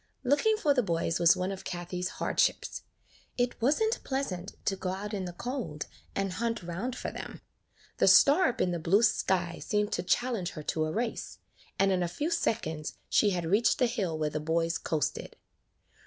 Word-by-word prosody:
Looking 295 Hz, -, +3 dB
for 300 Hz, -9 st, +3 dB
the 260 Hz, -, +3 dB
boys 170 Hz, -5 st, -1 dB
was 170 Hz, -1 st, +6 dB
one 185 Hz, +2 st, -1 dB
of 190 Hz, -1 st, -6 dB
Kathie's 180 Hz, +1 st, -4 dB
hardships. -, -, 0 dB, 0.6 s
It 245 Hz, -1 st, -1 dB
was 275 Hz, +6 st, +3 dB
n't 440 Hz, +2 st, 0 dB
pleasant 205 Hz, -9 st, -3 dB
to 195 Hz, -, +1 dB
go 185 Hz, -1 st, -4 dB
out 200 Hz, +3 st, -4 dB
in 195 Hz, -2 st, -2 dB
the 175 Hz, -, -5 dB
cold 225 Hz, -, -4 dB, 0.3 s
and 195 Hz, -1 st, -1 dB
hunt 230 Hz, +1 st, -2 dB
round 185 Hz, +9 st, -4 dB
for -, -, -4 dB
them; -, -, -8 dB, 0.6 s
the -, -, +3 dB
star 300 Hz, +7 st, +7 dB
up 250 Hz, -1 st, -2 dB
in 180 Hz, -, +2 dB
the 175 Hz, -, -2 dB
blue 190 Hz, +7 st, +3 dB
sky 185 Hz, -5 st, +1 dB
seemed 210 Hz, -1 st, 0 dB
to -, -, 0 dB
challenge 190 Hz, 0 st, 0 dB
her 155 Hz, -, -7 dB
to 155 Hz, +1 st, 0 dB
a 155 Hz, -, -2 dB
race, 230 Hz, +5 st, -3 dB, 0.4 s
and 195 Hz, 0 st, +3 dB
in 185 Hz, -1 st, +1 dB
a 175 Hz, -, +1 dB
few 295 Hz, -, -3 dB
seconds 160 Hz, -, -1 dB
she 210 Hz, -, +4 dB
had 175 Hz, -3 st, -1 dB
reached 205 Hz, +8 st, +3 dB
the 255 Hz, -, +3 dB
hill 200 Hz, -9 st, -1 dB
where 155 Hz, -1 st, -1 dB
the 150 Hz, -, -2 dB
boys 165 Hz, +2 st, 0 dB
coasted. 155 Hz, -2 st, -2 dB
190 Hz, 195 wpm, -29 LUFS, 170-240 Hz, 0.6 s, star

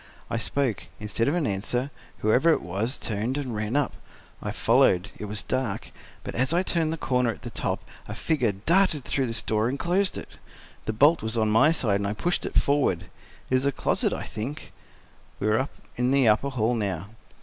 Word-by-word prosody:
I -, -, 0 dB
spoke; 115 Hz, +2 st, -1 dB
instead 110 Hz, +2 st, -1 dB
of 145 Hz, -, +2 dB
an 170 Hz, -4 st, +1 dB
answer, 120 Hz, +7 st, -1 dB, 0.3 s
whoever 125 Hz, +10 st, +4 dB
it -, -, +1 dB
was 105 Hz, +9 st, -1 dB
turned 110 Hz, +5 st, -2 dB
and 135 Hz, -5 st, -3 dB
ran 110 Hz, +3 st, -2 dB
up. 145 Hz, -2 st, +1 dB, 0.5 s
I -, -, -3 dB
followed—it 95 Hz, +3 st, +2 dB
was 105 Hz, +1 st, -4 dB
dark—but 130 Hz, -6 st, -5 dB
as 130 Hz, +6 st, +1 dB
I 175 Hz, +2 st, +3 dB
turned 165 Hz, -4 st, 0 dB
the 165 Hz, -, -2 dB
corner 125 Hz, -4 st, +1 dB
at 110 Hz, -, -5 dB
the -, -, -6 dB
top -, -, -2 dB, 0.2 s
a -, -, -5 dB
figure 135 Hz, -9 st, +1 dB
darted 155 Hz, -, +2 dB
through 135 Hz, -2 st, 0 dB
this 115 Hz, -1 st, -1 dB
door 110 Hz, +2 st, +1 dB
and 135 Hz, -, -2 dB
closed 185 Hz, +5 st, +1 dB
it. -, -, -9 dB, 0.5 s
The 110 Hz, -, -1 dB
bolt 145 Hz, +9 st, +5 dB
was 110 Hz, +1 st, -2 dB
on 110 Hz, -1 st, +2 dB
my 115 Hz, +8 st, +5 dB
side, 110 Hz, -11 st, +2 dB
and 100 Hz, -, -1 dB
I 100 Hz, -, -1 dB
pushed 175 Hz, +11 st, -1 dB
it -, -, -2 dB
forward. 130 Hz, -12 st, +1 dB, 0.4 s
It -, -, +4 dB
is 130 Hz, +2 st, +2 dB
a -, -, +3 dB
closet, -, -, +1 dB
I -, -, -3 dB
think." 125 Hz, +8 st, -6 dB, 0.7 s
We -, -, -2 dB
were 110 Hz, +6 st, +2 dB, 0.3 s
in 125 Hz, +1 st, +1 dB
the 135 Hz, -2 st, +4 dB
upper 110 Hz, +6 st, +3 dB
hall 120 Hz, -3 st, +1 dB
now. 100 Hz, -5 st, -2 dB
120 Hz, 200 wpm, -26 LUFS, 105-140 Hz, 0.7 s, bolt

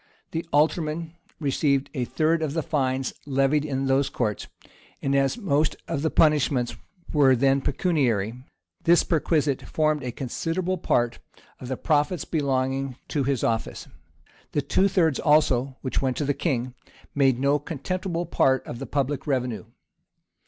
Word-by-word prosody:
The 165 Hz, -, -2 dB
aldermen 155 Hz, +2 st, +1 dB, 0.3 s
received 140 Hz, -2 st, +1 dB
a 130 Hz, -5 st, -1 dB
third 160 Hz, +5 st, +1 dB
of 155 Hz, -3 st, -1 dB
the 165 Hz, -1 st, -1 dB
fines 130 Hz, -3 st, -1 dB
levied 135 Hz, +2 st, +2 dB
in 135 Hz, -2 st, -2 dB
those 135 Hz, +1 st, +2 dB
courts;[] 110 Hz, -6 st, -2 dB, 0.5 s
and 135 Hz, 0 st, 0 dB
as 135 Hz, -, +2 dB
most 155 Hz, -9 st, +1 dB
of 140 Hz, -, -2 dB
the 160 Hz, -, +1 dB
punishments 140 Hz, -6 st, +2 dB, 0.4 s
were 140 Hz, -4 st, +5 dB
then 135 Hz, +2 st, +3 dB
pecuniary, 130 Hz, -, 0 dB, 0.5 s
this 170 Hz, +1 st, +5 dB
perquisite 150 Hz, -4 st, +1 dB
formed 155 Hz, -1 st, 0 dB
a 125 Hz, -2 st, -4 dB
considerable 170 Hz, +9 st, -2 dB
part 120 Hz, -7 st, +1 dB, 0.4 s
of 125 Hz, -, -8 dB
the 130 Hz, 0 st, -3 dB
profits 155 Hz, +2 st, +1 dB
belonging 135 Hz, -3 st, -1 dB
to 145 Hz, -4 st, 0 dB
his 135 Hz, -3 st, 0 dB
office. 115 Hz, -, -2 dB, 0.7 s
The 145 Hz, -, 0 dB
two 195 Hz, -, +2 dB
thirds 165 Hz, -7 st, +2 dB
also, 135 Hz, -4 st, +2 dB
which 130 Hz, -, -1 dB
went 130 Hz, -2 st, -1 dB
to 145 Hz, -, -1 dB
the 145 Hz, -, +1 dB
king, 130 Hz, -4 st, -2 dB, 0.4 s
made 135 Hz, -3 st, +3 dB
no 140 Hz, +3 st, +2 dB
contemptible 170 Hz, +4 st, -3 dB
part 130 Hz, -5 st, +2 dB
of 120 Hz, -, -7 dB
the 135 Hz, -, -6 dB
public 140 Hz, +1 st, -2 dB
revenue. 125 Hz, -5 st, -1 dB
140 Hz, 150 wpm, -25 LUFS, 130-155 Hz, 0.7 s, were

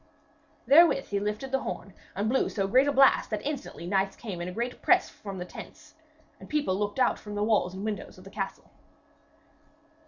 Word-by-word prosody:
Therewith 305 Hz, -1 st, +5 dB
he 200 Hz, -, 0 dB
lifted 210 Hz, +6 st, -3 dB
the 270 Hz, -, +2 dB
horn 195 Hz, -6 st, -6 dB, 0.2 s
and 200 Hz, +3 st, -1 dB
blew 260 Hz, +4 st, +2 dB
so 195 Hz, -3 st, -1 dB
great 255 Hz, +7 st, +4 dB
a -, -, +3 dB
blast 275 Hz, -1 st, +5 dB
that 215 Hz, -2 st, -3 dB
instantly 280 Hz, -, -5 dB
knights 195 Hz, +1 st, 0 dB
came 195 Hz, -7 st, -6 dB
in 175 Hz, -, -4 dB
a -, -, -4 dB
great 235 Hz, +6 st, -4 dB
press -, -, +4 dB
from 200 Hz, -2 st, -8 dB
the 180 Hz, -, -5 dB
tents, -, -, -12 dB, 0.5 s
and -, -, -12 dB
people 300 Hz, -10 st, 0 dB
looked 205 Hz, +3 st, -2 dB
out 260 Hz, -, +2 dB
from 210 Hz, -1 st, -8 dB
the 205 Hz, -, 0 dB
walls 210 Hz, -4 st, +1 dB
and 195 Hz, +2 st, -5 dB
windows 210 Hz, -3 st, -5 dB
of 185 Hz, -, -14 dB
the 195 Hz, -, -12 dB
castle. 195 Hz, -2 st, -5 dB
210 Hz, 205 wpm, -28 LUFS, 195-260 Hz, 0.5 s, Therewith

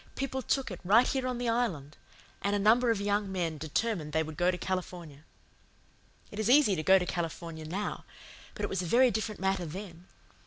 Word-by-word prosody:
People 265 Hz, -1 st, -3 dB
took 265 Hz, -1 st, -1 dB
it, 185 Hz, -, -7 dB
right 215 Hz, +7 st, +5 dB
here 260 Hz, -2 st, -1 dB
on 250 Hz, -1 st, -2 dB
the 245 Hz, 0 st, -2 dB
Island; 190 Hz, -, -1 dB, 0.5 s
and 200 Hz, +1 st, 0 dB
a -, -, +2 dB
number 225 Hz, +4 st, +4 dB
of 225 Hz, -3 st, +1 dB
young 205 Hz, 0 st, 0 dB
men 170 Hz, -5 st, -2 dB
determined 160 Hz, 0 st, -2 dB
they 160 Hz, -, +2 dB
would 155 Hz, 0 st, -8 dB
go 175 Hz, +4 st, +2 dB
to 180 Hz, -, 0 dB
California. 175 Hz, -5 st, -5 dB, 1.1 s
"It 210 Hz, -, -7 dB
is 215 Hz, +1 st, 0 dB
easy 260 Hz, -7 st, +5 dB
to 155 Hz, -, -2 dB
go 190 Hz, +4 st, +6 dB
to 180 Hz, -, -1 dB
California 165 Hz, -2 st, -5 dB
now; 195 Hz, +6 st, -4 dB, 0.5 s
but -, -, -6 dB
it -, -, +1 dB
was 190 Hz, -, -1 dB
a 180 Hz, -, -4 dB
very 245 Hz, +6 st, +5 dB
different 215 Hz, 0 st, -3 dB
matter 190 Hz, -2 st, 0 dB
then. 180 Hz, +1 st, -9 dB
190 Hz, 205 wpm, -30 LUFS, 170-225 Hz, 1.1 s, go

